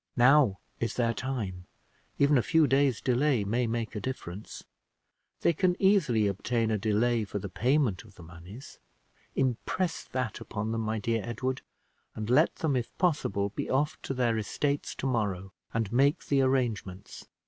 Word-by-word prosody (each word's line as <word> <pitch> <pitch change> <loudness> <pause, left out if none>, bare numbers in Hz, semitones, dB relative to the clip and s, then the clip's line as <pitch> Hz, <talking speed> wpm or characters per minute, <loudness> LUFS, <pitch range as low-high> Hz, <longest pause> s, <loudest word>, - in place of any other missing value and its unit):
Now 125 -4 +5 0.2
is 115 -2 -2
their 115 -2 +1
time: 105 -9 -4 0.5
even 140 +1 +4
a 125 - +5
few 160 +5 +3
days' 135 -2 +2
delay 130 -2 +2
may 115 +4 0
make 115 0 -3
a - - -2
difference. 105 -6 -6 0.8
They 170 - +3
can 180 +2 +1
easily 165 - +3
obtain 110 +3 0
a 110 - +1
delay 115 +2 +1
for 105 - -5
the 100 0 -5
payment 125 -2 +1
of 105 -3 -18
the 85 - -13
moneys. 90 - -12 0.6
Impress 135 +7 -1
that 125 -4 -3
upon 110 +1 -4
them, 115 0 -1
my 110 0 -1
dear 115 +1 -1
Edward, 130 +3 -3 0.5
and 110 +2 -3
let 150 +6 +4
them, 155 -4 0
if 120 -2 -3
possible, 125 - +1
be - - -5
off 145 +3 0
to 135 - -4
their 120 -3 +1
estates 140 +7 -2
to - - -5
morrow 100 -7 -1 0.2
and 115 -1 -2
make 140 +4 +3
the 140 -1 +2
arrangements." 115 -8 -2
120 Hz, 165 wpm, -29 LUFS, 105-135 Hz, 0.8 s, Now